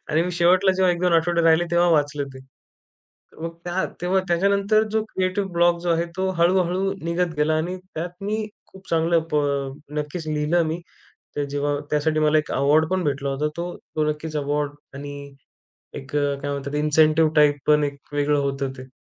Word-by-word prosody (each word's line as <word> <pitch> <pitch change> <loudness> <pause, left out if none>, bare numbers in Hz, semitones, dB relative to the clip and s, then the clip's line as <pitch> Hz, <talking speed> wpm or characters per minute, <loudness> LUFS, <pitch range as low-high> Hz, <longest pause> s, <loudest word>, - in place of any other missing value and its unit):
आणि 155 +2 +3
मी 180 - -2
शेवटला 180 +3 +4
जेव्हा 185 -1 +3
1-2 175 0 0
आठवडे 170 +1 +2
राहिले 165 +1 +4
तेव्हा 175 0 +3
वाचलं 145 -2 +1
ते. - - -9 1.0
मग 165 0 -4
त्या 175 +2 -1 0.2
तेव्हा 180 +2 +2
त्याच्यानंतर 200 +4 +3
जो 220 0 +1
क्रिएटिव 185 +1 0
ब्लॉक 170 0 +3
जो 175 - -2
आहे, 165 0 +2
तो 190 0 0
हळू-हळू 185 +2 +2
निघत 170 0 -1
गेला. 155 +1 +2
आणि 175 +4 -2 0.2
त्यात 165 +2 -3
मी 215 +1 -2 0.2
खूप 190 0 -16
चांगलं 165 0 +2
प 150 - +4 0.6
नक्कीच 155 +2 -5
लिहिलं 155 +3 +1
मी. 160 +2 -2 0.6
ते 145 -1 -1
जेव्हा 145 0 -1
त्यासाठी 155 +1 +1
मला 155 0 +4
एक 155 - -3
अवॉर्ड 150 +4 +3
पण 185 -1 0
भेटला 140 -1 -1
होता 140 +3 -1
तो. 175 +1 -4 0.2
तो 155 - +2
नक्कीच 155 +1 -5
अवॉर्ड 145 0 -1 0.2
आणि 145 +1 -7 0.8
एक 135 +2 -8
अ, 145 -1 +1
काय 145 0 -3
म्हणतात 140 +1 -4
इन्सेंटिव्ह 155 +1 +3
टाइप 150 -1 +5
पण 150 0 +4
एक 140 -1 -4 0.2
वेगळं 145 0 +2
होतं 135 -1 -2
ते. 130 - -10
160 Hz, 180 wpm, -23 LUFS, 145-175 Hz, 1.0 s, टाइप